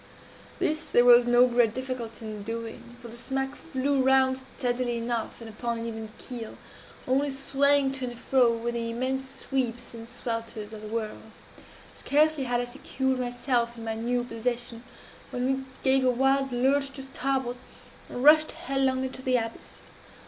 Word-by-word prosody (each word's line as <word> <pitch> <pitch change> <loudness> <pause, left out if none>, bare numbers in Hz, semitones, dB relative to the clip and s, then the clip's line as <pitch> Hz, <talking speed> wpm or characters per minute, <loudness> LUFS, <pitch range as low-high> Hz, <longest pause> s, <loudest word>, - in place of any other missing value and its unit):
This 320 -4 0
there 240 - +5
was 245 0 +8
no 240 +1 +6
great 240 -2 +2
difficulty 255 -3 -5
in 215 -1 -6
doing; 230 +2 -6
for 240 - -10
the 230 - -9
smack 270 +3 -2
flew 275 -2 0
round 265 0 +4 0.2
steadily 245 -1 0
enough, 235 0 -3
and 230 - -8
upon 235 +2 -3
an 230 - -4
even 220 -1 -5
keel 235 -4 -8 0.5
only 275 +3 +2
swaying 275 0 +2
to 265 -1 -4
and 240 -1 -6
fro, 245 0 +3
with 230 +1 -2
the 230 -1 -2
immense 260 +3 -2 0.2
sweeps 245 -4 -2
and 230 0 -9
swelters 230 -3 -5
of 215 - -8
the 215 - -7
whirl. 215 -1 -3 0.7
Scarcely 300 -1 +2
had 245 -1 +1
I - - -2
secured 265 +1 -2
myself 245 -1 0
in 230 - -8
my 225 - -1
new 240 +2 -1
position, 240 0 -3 0.5
when 250 -2 -2
we 265 0 0 0.2
gave 265 0 +5
a 255 - +4
wild 270 +2 +2
lurch 270 +3 +2
to 270 - -7
starboard, 265 -2 -2 0.5
and 245 - -4
rushed 310 +1 +7
headlong 270 -5 0
into 260 0 -5
the 255 -1 +1
abyss. 225 -1 -6
245 Hz, 170 wpm, -27 LUFS, 235-265 Hz, 0.7 s, was